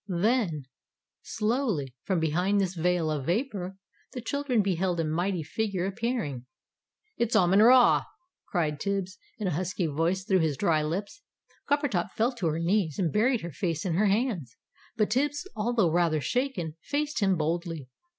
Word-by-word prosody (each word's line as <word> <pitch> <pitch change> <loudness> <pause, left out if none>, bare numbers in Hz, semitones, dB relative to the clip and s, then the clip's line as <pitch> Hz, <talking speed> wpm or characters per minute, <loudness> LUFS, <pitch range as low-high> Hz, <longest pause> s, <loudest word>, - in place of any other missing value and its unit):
Then, 185 - 0 0.6
slowly, 210 - -1
from 190 -3 +1
behind 180 +6 +1
this 190 -2 0
veil 175 -2 +1
of 145 -3 -3
vapour, 195 -2 -2 0.4
the 250 - -5
children 250 -2 0
beheld 185 -2 0
a - - +2
mighty 175 +3 -1
figure 190 +2 -2
appearing. 195 - -3 0.7
"It's 235 0 0
Amon 185 +2 +5
Ra!" 245 +2 +6 0.4
cried 155 -5 -1
Tibbs, 190 -1 -2 0.2
in 210 - -4
a 185 - +1
husky 180 +2 -1
voice, 165 +5 0
through 190 -1 +3
his 155 -4 0
dry 165 -6 +2
lips. 190 - -4 0.5
Coppertop 285 - 0
fell 230 +3 +1
to 180 - -1
her 155 0 0
knees, 170 -2 +1
and 170 -5 0
buried 235 +3 +2
her 170 - -6
face 165 +1 -2
in 180 - 0
her 205 +5 +3
hands. 200 - -1 0.4
But 215 -2 +1
Tibbs, 290 - 0
although 220 -5 +1
rather 165 -2 +2
shaken, 180 - -2
faced 295 +1 -2
him 195 -3 +2
boldly. 165 -2 -2
185 Hz, 160 wpm, -28 LUFS, 165-220 Hz, 0.7 s, Ra